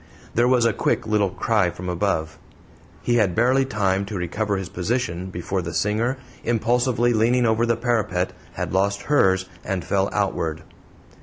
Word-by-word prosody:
There 120 +1 +3
was 125 -2 +3
a 115 - +3
quick - - 0
little 105 -2 +2
cry 100 -1 +1
from 90 +2 -7
above. 80 -4 -1 0.6
He 120 0 +2
had 100 -6 +2
barely 130 +4 +3
time 100 -5 0
to 105 - -6
recover 100 +4 -1
his 95 -2 -4
position 90 -2 -2
before 95 +1 -3
the 85 -2 -5
singer, 110 +9 0 0.3
impulsively 120 +1 +2
leaning 120 +3 +3
over 115 +1 +2
the 115 -1 +2
parapet, 105 -6 0 0.2
had - - -4
lost 100 +1 +1
hers, 95 -10 +3 0.2
and 95 -3 -3
fell 95 0 +1
outward. 85 -6 -1
105 Hz, 160 wpm, -23 LUFS, 95-120 Hz, 0.6 s, There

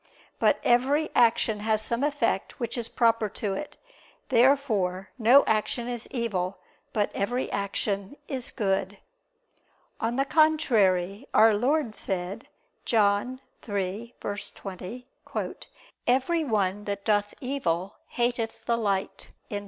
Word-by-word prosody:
But - - +3
every 275 +6 +3
action 225 -2 +3
has 215 0 +1
some 235 +4 -1
effect 290 0 0
which 235 -2 -2
is 235 -2 -3
proper 230 -2 +2
to 205 -3 -1
it. 295 +9 -6 0.5
Therefore 230 -8 +2
no 245 +5 +7
action 220 +2 0
is 240 -2 -5
evil, 200 -7 -2 0.3
but 210 -2 0
every 245 +6 -1
action 200 +3 -2
is 260 -2 -4
good. 195 -2 -1 1.0
On 230 +2 -1
the 270 +1 +1
contrary, 230 - +2
Our 220 +1 +7
Lord 250 +3 +1
said 190 +2 -4 0.4
(John 220 +4 +1 0.2
3:20): 205 +1 -5 1.0
"Every 270 +7 +2
one 205 -4 0
that 200 -1 -4
doth 205 -1 +1
evil, 195 -9 -2
hateth 235 -2 -2
the 235 -1 +1
light." 200 -3 -1
225 Hz, 115 wpm, -27 LUFS, 200-250 Hz, 1.0 s, no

